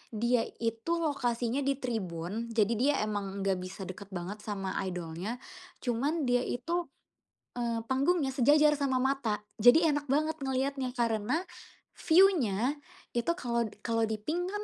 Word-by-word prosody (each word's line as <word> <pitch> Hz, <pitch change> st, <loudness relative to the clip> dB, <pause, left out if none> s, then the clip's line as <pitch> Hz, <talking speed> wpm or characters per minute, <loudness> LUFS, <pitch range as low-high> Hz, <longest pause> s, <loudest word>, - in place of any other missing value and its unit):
dia 235 Hz, +1 st, +2 dB, 0.2 s
itu 230 Hz, +7 st, -1 dB
lokasinya 245 Hz, -4 st, 0 dB
di 275 Hz, -, +2 dB
tribun 215 Hz, -4 st, -3 dB
jadi 220 Hz, +1 st, +3 dB
dia 280 Hz, +4 st, +3 dB
emang 200 Hz, -2 st, -3 dB
nggak 195 Hz, -2 st, +1 dB
bisa 185 Hz, +2 st, -7 dB
dekat 185 Hz, +1 st, -8 dB
banget 185 Hz, +4 st, -5 dB
sama 195 Hz, -2 st, -4 dB, 0.2 s
idolnya, 180 Hz, +4 st, -4 dB, 0.5 s
cuman 275 Hz, +6 st, 0 dB
dia 245 Hz, 0 st, +3 dB
itu, 340 Hz, +8 st, -2 dB, 0.7 s
eee, 235 Hz, -1 st, -1 dB
panggungnya 275 Hz, +3 st, +2 dB
sejajar 295 Hz, +3 st, +5 dB
sama 270 Hz, -2 st, +1 dB
mata, 265 Hz, -6 st, 0 dB, 0.2 s
jadi 315 Hz, +9 st, +7 dB
enak 290 Hz, 0 st, -2 dB
banget 310 Hz, +3 st, +1 dB
ngeliatnya 265 Hz, 0 st, -1 dB
karena, 230 Hz, +6 st, +1 dB, 0.6 s
view-nya 295 Hz, -, +4 dB, 0.3 s
itu 240 Hz, -1 st, -1 dB
kalo 235 Hz, -6 st, 0 dB, 0.2 s
kalo 230 Hz, -1 st, +1 dB
di 220 Hz, -, 0 dB
pink 345 Hz, +10 st, -2 dB
kan, 415 Hz, 0 st, -3 dB
240 Hz, 140 wpm, -30 LUFS, 210-280 Hz, 0.7 s, jadi